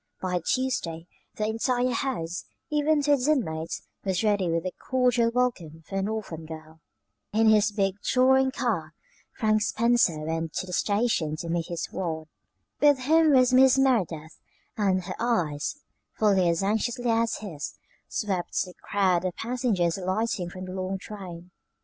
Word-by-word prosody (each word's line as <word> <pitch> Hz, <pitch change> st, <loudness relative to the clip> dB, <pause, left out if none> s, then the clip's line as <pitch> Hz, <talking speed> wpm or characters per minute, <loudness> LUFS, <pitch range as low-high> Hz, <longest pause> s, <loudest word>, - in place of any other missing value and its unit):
By 180 Hz, -1 st, -1 dB
Tuesday 170 Hz, -6 st, -1 dB, 0.3 s
the 215 Hz, -, -1 dB
entire 245 Hz, +3 st, 0 dB
house, 230 Hz, -10 st, -3 dB, 0.3 s
even 300 Hz, 0 st, +2 dB
to 290 Hz, -, +2 dB
its 280 Hz, -2 st, +3 dB
inmates, 165 Hz, -, -1 dB, 0.2 s
was 190 Hz, +1 st, 0 dB
ready 205 Hz, -4 st, +2 dB
with 165 Hz, +1 st, -1 dB
a 185 Hz, -, -1 dB, 0.2 s
cordial 250 Hz, -2 st, +3 dB
welcome 210 Hz, -11 st, -1 dB
for 195 Hz, 0 st, -2 dB
the 195 Hz, -, -1 dB
orphan 175 Hz, -8 st, -5 dB
girl. 160 Hz, 0 st, -10 dB, 0.5 s
In 220 Hz, +1 st, +4 dB
his 210 Hz, -1 st, +4 dB
big 195 Hz, -2 st, 0 dB
touring 265 Hz, +1 st, +4 dB
car 200 Hz, -12 st, -2 dB, 0.4 s
Frank 215 Hz, -1 st, +2 dB
Spencer 230 Hz, -6 st, +2 dB
went 160 Hz, +1 st, -3 dB
to -, -, -2 dB
the 180 Hz, -, -8 dB
station 200 Hz, -7 st, +1 dB
to 165 Hz, +2 st, -6 dB
meet 165 Hz, -1 st, -1 dB
his 170 Hz, -1 st, -3 dB
ward. 160 Hz, -3 st, -4 dB, 0.5 s
With 290 Hz, -1 st, +5 dB
him 310 Hz, +4 st, +4 dB
was 255 Hz, -1 st, +5 dB
Mrs. 265 Hz, +1 st, +6 dB
Merideth, 175 Hz, -, 0 dB, 0.4 s
and 190 Hz, -3 st, +1 dB
her -, -, -5 dB
eyes, 175 Hz, -, 0 dB, 0.4 s
fully 195 Hz, -5 st, +3 dB
as 170 Hz, +2 st, 0 dB
anxiously 235 Hz, +4 st, 0 dB
as 230 Hz, 0 st, +1 dB
his, 165 Hz, -9 st, -6 dB, 0.3 s
swept 190 Hz, -4 st, -2 dB
the 180 Hz, -, -11 dB
crowd 185 Hz, -4 st, +1 dB
of 185 Hz, -2 st, -2 dB
passengers 225 Hz, -8 st, 0 dB
alighting 185 Hz, -1 st, -1 dB
from 185 Hz, +1 st, -8 dB
the 185 Hz, -, -7 dB
long 190 Hz, +1 st, -3 dB
train. 180 Hz, -3 st, -9 dB
200 Hz, 155 wpm, -26 LUFS, 170-245 Hz, 0.5 s, Mrs